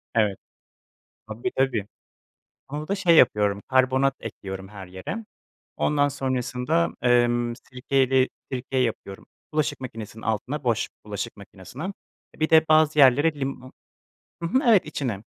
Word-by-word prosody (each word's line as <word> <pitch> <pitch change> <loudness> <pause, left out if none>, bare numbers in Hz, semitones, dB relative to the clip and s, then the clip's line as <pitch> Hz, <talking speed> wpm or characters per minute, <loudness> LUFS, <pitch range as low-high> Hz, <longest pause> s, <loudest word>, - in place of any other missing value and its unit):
Evet, 105 -4 +2 0.9
tabi, 110 +11 -4
tabii. 125 -6 +1 0.8
Onu 150 +2 -5
da 200 - +1
şey 180 -5 +4
yapıyorum, 105 -6 +4
karbonat 130 +1 +3
ekliyorum 95 -3 -7
her 100 -2 -10
yere. 95 - -6 0.5
Ondan 145 -1 +2
sonrasında, 125 -8 -1
emm, 120 -1 +3
sirkeyle 130 +1 +1 0.2
sirke 130 +1 -4
yapıyorum. 115 -5 -3 0.3
Bulaşık 155 -3 -1
makinesinin 115 -3 -8
altına 125 +7 -2
boş 120 -3 +1 0.2
bulaşık 105 +2 -5
makinesine, 100 - -10 0.5
e, - - -22
bir 155 - +1
de 160 0 +6
bazı 155 -1 +4
yerlere 145 +4 +6
limo 135 -1 -5 0.7
Hı - - 0
hı, 260 - +2
evet, 215 -5 +6
içine. 125 -9 -4
125 Hz, 130 wpm, -25 LUFS, 110-145 Hz, 0.9 s, de